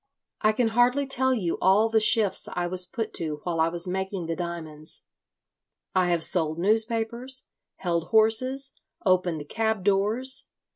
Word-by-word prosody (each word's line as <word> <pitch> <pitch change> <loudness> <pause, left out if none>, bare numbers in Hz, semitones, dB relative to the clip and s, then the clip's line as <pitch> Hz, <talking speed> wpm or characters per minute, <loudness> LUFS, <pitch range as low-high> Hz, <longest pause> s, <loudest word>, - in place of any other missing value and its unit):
"I 215 - +3
can 225 +1 0
hardly 245 +5 +2
tell 260 -1 +1
you 190 -10 -2
all 195 +4 +4
the 225 0 +2
shifts 215 -2 +3
I 175 - -3
was 180 +1 +3
put 220 +3 -5
to 155 -3 -5
while 170 -2 -3
I 160 - +3
was 170 +2 -4
making 190 0 -4
the 165 0 -3
diamonds. 160 -3 -7 0.9
I 185 -1 +1
have 170 -2 +2
sold 160 -3 +3
newspapers, 225 +6 +1 0.3
held 170 -2 -3
horses, 255 +5 +2 0.3
opened 180 -5 0
cab 220 0 -2
doors. 210 +7 +1
195 Hz, 150 wpm, -25 LUFS, 175-225 Hz, 0.9 s, all